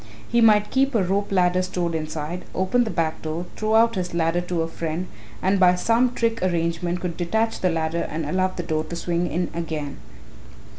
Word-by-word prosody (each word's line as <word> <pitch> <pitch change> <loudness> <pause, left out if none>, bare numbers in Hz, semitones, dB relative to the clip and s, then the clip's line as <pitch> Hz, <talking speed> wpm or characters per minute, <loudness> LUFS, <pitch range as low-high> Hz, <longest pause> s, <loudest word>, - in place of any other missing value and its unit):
He 235 0 +2
might 210 -2 +5
keep 270 0 +2
a 210 - +3
rope 200 +3 -1
ladder 180 -1 +3
stored 180 -2 -2
inside, 160 +2 -4
open 215 +7 +2
the - - -3
back 165 -3 -1
door, 160 +3 -3
throw 215 +1 0
out 230 +1 +5
his 180 -4 -3
ladder 165 +1 +1
to 175 -2 -1
a - - -2
friend 165 +1 -3 0.4
and 190 +1 +2
by 180 -1 +6
some 230 +6 +2
trick 230 -1 0
arrangement 175 0 0
could 175 -2 -4
detach 220 +7 0
the 185 - +2
ladder 165 0 -1
and 155 0 -3
allow 185 +5 +1
the 185 -1 -6
door 155 -2 -1
to 170 - -6
swing 170 0 -1
to 175 0 -2
again." 155 -4 -4
180 Hz, 200 wpm, -23 LUFS, 165-200 Hz, 0.4 s, by